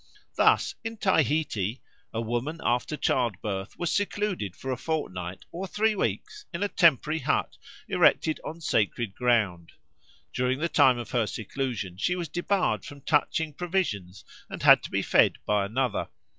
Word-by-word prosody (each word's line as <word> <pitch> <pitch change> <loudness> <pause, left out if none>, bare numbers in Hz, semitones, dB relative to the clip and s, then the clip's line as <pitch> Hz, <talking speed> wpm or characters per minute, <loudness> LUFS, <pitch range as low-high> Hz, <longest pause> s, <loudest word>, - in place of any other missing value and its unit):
Thus, - - +3
in 225 0 -5
Tahiti 145 - +1 0.3
a 115 - -2
woman 120 +8 -3
after 125 +5 0
childbirth 105 -7 -1
was 175 -1 -1
secluded 195 - -1
for 135 - -5
a - - 0
fortnight 95 - -4
or 185 +3 -5
three 215 +3 +1
weeks 420 - -3
in 175 +2 -3
a - - +2
temporary 160 - +3
hut 135 - 0 0.3
erected 155 - +3
on 165 +2 -7
sacred 110 -5 0
ground; 105 -9 0 0.6
during 125 +1 0
the 170 +4 -1
time 130 -5 +5
of 120 -3 -6
her 115 -3 +1
seclusion 110 -3 -4
she 180 - 0
was 175 -4 -4
debarred 180 +4 0
from 145 -1 -10
touching 155 +1 +1
provisions, 140 - -2 0.2
and - - -7
had - - +8
to - - -7
be - - -1
fed - - +4
by 105 -1 +1
another. 120 0 -1
130 Hz, 155 wpm, -27 LUFS, 105-170 Hz, 0.6 s, had